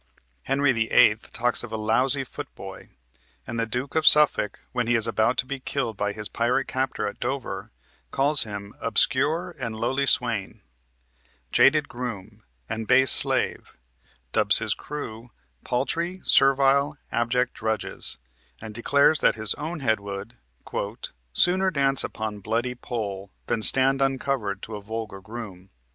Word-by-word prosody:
Henry 135 +1 +2
VIII. 110 -2 +4
talks 120 +1 0
of 120 - -8
a 110 - -3
"lousy 125 +6 +2
footboy," 125 - -10 0.6
and 115 - -5
the 115 - -1
Duke 125 +5 -4
of 160 -1 +1
Suffolk, 150 -9 +5
when 125 -2 -2
he 120 - +2
is 110 -1 +1
about 115 +2 +1
to 125 - +1
be 140 +1 -5
killed 130 -4 -3
by 105 0 -2
his 105 0 -7
pirate 125 +3 -1
captor 130 -4 -2
at 100 - -6
Dover, 130 +2 -4 0.4
calls 140 +2 +3
him 100 -2 -6
"obscure 150 - +1
and 115 -4 -4
lowly 130 +5 -1
swain," 115 -7 +2 0.9
"jaded 150 +1 +4
groom," 110 -4 -7 0.2
and 110 +5 -5
"base 130 -1 +5
slave," - - +1 0.5
dubs - - +3
his - - -1
crew 120 -5 -8 0.3
"paltry, 170 +9 -2
servile, 140 +1 +3
abject 120 +2 0
drudges," 110 -1 -4 0.4
and 110 -1 -9
declares 140 +6 +2
that - - +3
his 110 -3 +1
own 155 +2 -6
head 110 -5 +1
would 100 +2 -8 1.0
"sooner 185 - +3
dance 140 -5 +3
upon 110 -2 -5
bloody 115 +5 -2
pole 105 -6 -6 0.2
Than 115 - -2
stand 135 +4 +6
uncovered 130 -7 -1
to 110 - -7
a 105 - -7
vulgar 110 -2 -6
groom." 100 -4 -10
120 Hz, 145 wpm, -24 LUFS, 110-135 Hz, 1.0 s, stand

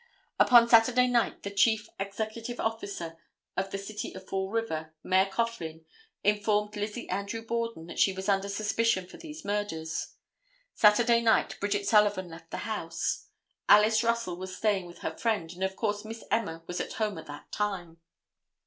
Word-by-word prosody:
Upon 240 -2 +7
Saturday 240 +2 +6
night 245 -2 +1
the 200 - -4
chief 215 +1 +3
executive 220 +4 -4
officer 200 -7 -3 0.4
of 195 0 -1
the 195 - -3
city 205 +2 -6
of 190 0 -10
Fall 190 0 -2
River, 160 -8 -3
Mayor 190 +1 +3
Coughlin, 190 -7 -3 0.4
informed 210 +1 +1
Lizzie 210 +3 -4
Andrew 200 +3 -3
Borden 230 -7 -2
that 170 - -7
she 195 - +5
was 190 0 -6
under 200 0 +2
suspicion 205 -1 +1
for 180 - -13
these 320 -1 -9
murders. 200 -6 -3 0.6
Saturday 230 +2 +5
night 225 -1 +3
Bridget 205 0 -1
Sullivan 205 -4 +3
left 165 0 -12
the - - -5
house. 165 -7 -2 0.4
Alice 215 +1 +6
Russell 230 -6 0
was 185 0 -6
staying 200 -4 +1
with 175 - -13
her - - -2
friend, 215 -9 -1
and 180 +2 -5
of 190 0 -1
course 210 -1 -1
Miss 225 +1 -8
Emma 165 -7 -1
was 175 - -3
at - - -5
home 215 -2 -1
at - - -11
that 145 0 -10
time. 180 -5 -3
205 Hz, 165 wpm, -29 LUFS, 185-225 Hz, 0.6 s, Upon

